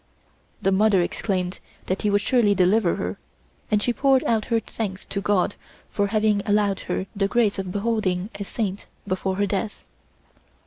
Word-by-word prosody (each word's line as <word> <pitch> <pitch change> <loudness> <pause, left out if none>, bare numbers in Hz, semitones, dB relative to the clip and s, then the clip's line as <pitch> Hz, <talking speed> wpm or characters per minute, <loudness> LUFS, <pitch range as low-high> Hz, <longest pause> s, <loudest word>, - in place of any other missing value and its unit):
The 195 - +3
mother 195 -1 +4
exclaimed 185 0 -2 0.3
that 185 - -2
he 210 - +1
would 205 0 +3
surely 210 -3 +3
deliver 185 0 +3
her, 90 +2 -4 0.5
and 210 -1 +2
she 245 - +1
poured 270 0 +3
out 220 -2 +1
her 230 -2 +1
thanks 205 -4 -5
to 200 - -3
God 200 -1 +1 0.4
for 205 -1 +1
having 210 -1 +2
allowed 205 -1 +2
her 190 - -1
the 195 -1 +1
grace 210 -2 +1
of 190 -1 -3
beholding 205 -2 -1
a 200 - -5
saint 200 -1 -3 0.2
before 190 +1 -1
her 205 +1 +1
death. 200 +2 -3
205 Hz, 170 wpm, -24 LUFS, 190-215 Hz, 0.5 s, mother